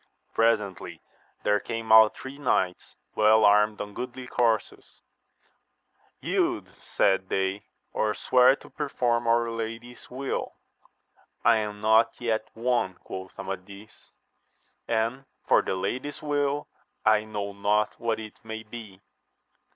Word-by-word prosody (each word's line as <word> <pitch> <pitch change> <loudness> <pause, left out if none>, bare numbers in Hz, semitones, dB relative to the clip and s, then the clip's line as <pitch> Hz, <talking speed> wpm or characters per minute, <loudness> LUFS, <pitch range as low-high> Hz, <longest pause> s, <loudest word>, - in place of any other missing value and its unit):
Presently 105 -5 0 0.4
there 105 0 +3
came 115 0 -4
out 110 -1 +8
three 135 +2 -9
knights, 95 -10 -1 0.2
well 110 0 +5
armed 105 +1 +4
on 105 0 -6
goodly 125 +2 -6
coursers; 115 -4 -1 1.2
Yield, - - -1
said 95 -1 +1
they, 95 +1 -1 0.3
or 105 -1 0
swear 130 +1 +5
to - - -16
perform 120 -4 -1
our 115 0 +2
lady's 115 +2 -6
wilL 135 +2 -4 0.9
I 115 -1 +6
am 105 -1 -4
not 110 +1 +3
yet 110 -2 -1
won, 115 -5 0
quoth 95 0 -8
Amadis; 100 +3 -9 0.8
and 115 +4 -1 0.2
for - - +5
the - - -2
lady's 130 +9 -3
will, 145 -1 0 0.4
I 110 0 +4
know 105 -2 -5
not 105 +1 +1
what 115 -2 -1
it 110 -1 -10
may 110 0 -6
be. 105 -3 -10
110 Hz, 120 wpm, -27 LUFS, 105-120 Hz, 1.2 s, out